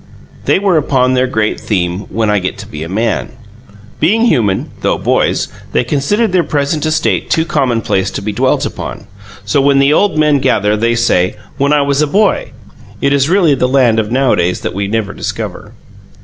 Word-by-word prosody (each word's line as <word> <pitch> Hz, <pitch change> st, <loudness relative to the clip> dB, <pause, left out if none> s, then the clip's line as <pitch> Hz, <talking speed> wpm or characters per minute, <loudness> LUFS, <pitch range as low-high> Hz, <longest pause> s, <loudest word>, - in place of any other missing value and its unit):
They -, -, +3 dB
were 190 Hz, -3 st, +2 dB
upon 130 Hz, -3 st, +1 dB
their 130 Hz, 0 st, +2 dB
great 110 Hz, -4 st, -1 dB
theme: 90 Hz, -1 st, -2 dB
"When 110 Hz, -1 st, -1 dB
I 105 Hz, -, +2 dB
get 95 Hz, 0 st, -4 dB
to -, -, -8 dB
be 75 Hz, -, -8 dB
a 80 Hz, -, -5 dB
man!" 110 Hz, +4 st, -2 dB, 0.7 s
Being 220 Hz, +9 st, +2 dB
human, 110 Hz, -, +1 dB
though -, -, +1 dB
boys, -, -, 0 dB, 0.3 s
they -, -, +2 dB
considered 165 Hz, -, 0 dB
their 180 Hz, -1 st, +2 dB
present 150 Hz, +1 st, -1 dB
estate 155 Hz, 0 st, 0 dB
too 160 Hz, -, +1 dB
commonplace 120 Hz, -, 0 dB
to -, -, -4 dB
be 105 Hz, -, -2 dB
dwelt 100 Hz, -, +1 dB
upon. -, -, -6 dB, 0.4 s
So, 105 Hz, +7 st, +1 dB
when 140 Hz, 0 st, +3 dB
the 140 Hz, +2 st, +4 dB
old 200 Hz, -1 st, +2 dB
men 150 Hz, -2 st, +3 dB
gather, 105 Hz, -6 st, +1 dB
they 115 Hz, +2 st, +1 dB
say: 95 Hz, -6 st, +1 dB, 0.2 s
"When 140 Hz, +1 st, +2 dB
I 150 Hz, -1 st, +3 dB
was 140 Hz, +1 st, +1 dB
a 150 Hz, -, +2 dB
boy!" 200 Hz, +6 st, +1 dB, 0.5 s
It 140 Hz, +1 st, +1 dB
really 180 Hz, -4 st, +3 dB
is 135 Hz, -, -3 dB
the 125 Hz, -, +2 dB
land 125 Hz, -4 st, +3 dB
of 110 Hz, 0 st, -2 dB
nowadays 120 Hz, -9 st, +1 dB
that -, -, -4 dB
we 100 Hz, +1 st, -2 dB
never 105 Hz, -1 st, -2 dB
discover. -, -, -6 dB
130 Hz, 190 wpm, -14 LUFS, 105-150 Hz, 0.7 s, the